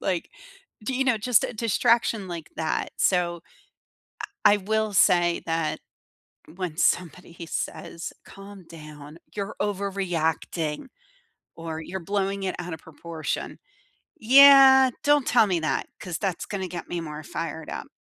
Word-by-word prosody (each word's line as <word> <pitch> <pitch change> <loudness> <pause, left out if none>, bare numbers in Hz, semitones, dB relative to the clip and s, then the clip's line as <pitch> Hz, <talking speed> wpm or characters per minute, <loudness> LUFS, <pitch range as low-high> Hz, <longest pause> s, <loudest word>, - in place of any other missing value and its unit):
like, 180 -3 -2 0.5
do 265 - -2
you 265 +1 +1
know, 250 -4 +2
just 230 +1 +3
a - - -3
distraction 230 -1 +1
like 170 -3 -7
that. 160 -1 -2
So, 175 -2 +1 1.0
I - - +7
I - - +2
will 215 +2 -1
say 175 -3 +3
that 165 -1 -1 0.8
when 180 -3 -5
somebody 170 -1 -1
says, 170 - -5
"Calm 195 -1 -13
down, 150 -1 -12 0.2
you're 200 -1 -5
overreacting," 180 - -2 0.7
or, 165 -1 -6
"You're 185 +4 -6
blowing 195 +2 -2
it 185 - -2
out 175 -2 -5
of 160 - -11
proportion." 160 0 -6 0.6
Yeah. 265 +1 +8
Don't 290 -2 +3
tell 235 -3 +4
me 180 -4 0
that 155 - -1
'cause 175 -3 -5
that's 190 -4 -2
gonna 190 -2 -4
get 175 0 -7
me 175 - -3
more 155 -2 -7
fired 160 0 -5
up. - - -6
180 Hz, 140 wpm, -25 LUFS, 165-210 Hz, 1.0 s, Yeah